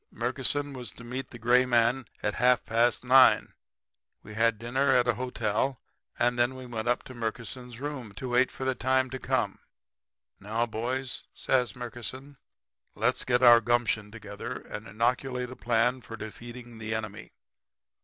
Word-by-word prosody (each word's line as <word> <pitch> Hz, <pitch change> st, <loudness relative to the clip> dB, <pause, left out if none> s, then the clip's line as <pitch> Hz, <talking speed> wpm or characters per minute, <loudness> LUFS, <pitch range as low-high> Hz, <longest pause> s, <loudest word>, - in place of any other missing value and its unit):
Murkison 145 Hz, -1 st, -1 dB
was 125 Hz, -5 st, -7 dB
to 115 Hz, -, -13 dB
meet 125 Hz, +3 st, -5 dB
the 120 Hz, -, -10 dB
gray 120 Hz, +2 st, +4 dB
man 120 Hz, 0 st, +2 dB, 0.2 s
at 105 Hz, -, 0 dB
half 125 Hz, +1 st, +3 dB
past 115 Hz, +2 st, +2 dB
9. 130 Hz, +1 st, +6 dB, 0.7 s
We 105 Hz, -, -10 dB
had 115 Hz, 0 st, +2 dB
dinner 120 Hz, +5 st, 0 dB
at 125 Hz, -1 st, +3 dB
a 120 Hz, -, +4 dB
hotel 125 Hz, +1 st, -1 dB, 0.4 s
and 120 Hz, 0 st, +1 dB
then 120 Hz, +2 st, +2 dB
went 120 Hz, -3 st, -5 dB
up 120 Hz, -, +1 dB
to 130 Hz, -, -10 dB
Murkison's 120 Hz, +1 st, -5 dB
room 135 Hz, -6 st, -5 dB
to 130 Hz, +5 st, -6 dB
wait 125 Hz, +1 st, +3 dB
for 130 Hz, -, -6 dB
the 130 Hz, -, +2 dB
time 130 Hz, +1 st, +1 dB
to 130 Hz, -, -4 dB
come. -, -, -1 dB, 0.8 s
"'Now, 110 Hz, +4 st, -1 dB
boys,' 125 Hz, +3 st, -3 dB
says 125 Hz, -2 st, +1 dB
Murkison, 125 Hz, +3 st, -7 dB, 0.6 s
'let's -, -, +1 dB
get 125 Hz, 0 st, +1 dB
our 120 Hz, -1 st, +9 dB
gumption 115 Hz, -3 st, +1 dB
together 110 Hz, +2 st, -7 dB
and 105 Hz, +1 st, -8 dB
inoculate 125 Hz, +4 st, -1 dB
a -, -, -8 dB
plan 120 Hz, +2 st, +1 dB
for 115 Hz, 0 st, -9 dB
defeating 120 Hz, +2 st, -9 dB
the 110 Hz, 0 st, -3 dB
enemy. 110 Hz, -1 st, -6 dB
120 Hz, 160 wpm, -28 LUFS, 115-130 Hz, 0.8 s, our